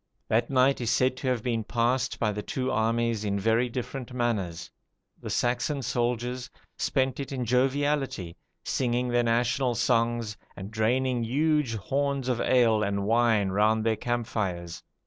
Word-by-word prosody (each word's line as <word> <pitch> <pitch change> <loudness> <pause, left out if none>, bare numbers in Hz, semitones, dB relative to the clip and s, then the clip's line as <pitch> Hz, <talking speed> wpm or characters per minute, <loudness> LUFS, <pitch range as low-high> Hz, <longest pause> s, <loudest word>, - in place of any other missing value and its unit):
That 115 +2 +2
night 135 0 +3
is 120 - -1
said 130 +1 +2
to 130 - -4
have 125 -3 0
been 115 -3 -1
passed 120 +3 0
by 110 -2 +1
the 105 0 -4
two 130 +2 -2
armies 115 0 0
in 100 -1 -1
very 115 +4 +2
different 125 +1 -5
manners. 110 -9 -2 0.5
The - - -6
Saxon 125 +3 0
soldiers 125 +1 -2 0.3
spent 130 -1 0
it 140 - -5
in 130 -2 -2
joviality, 135 - 0 0.3
singing 125 0 0
their 120 0 +3
national 120 +2 +1
songs, 115 -2 +1 0.2
and 95 +2 -8
draining 120 +3 +1
huge 145 0 +1
horns 135 +4 -1
of 120 -2 0
ale 115 -4 +3
and 100 -1 -1
wine 115 -3 +3
round 110 +3 +2
their 110 -1 +2
camp 120 +2 -2
fires. 85 -6 -3
120 Hz, 155 wpm, -27 LUFS, 110-130 Hz, 0.5 s, night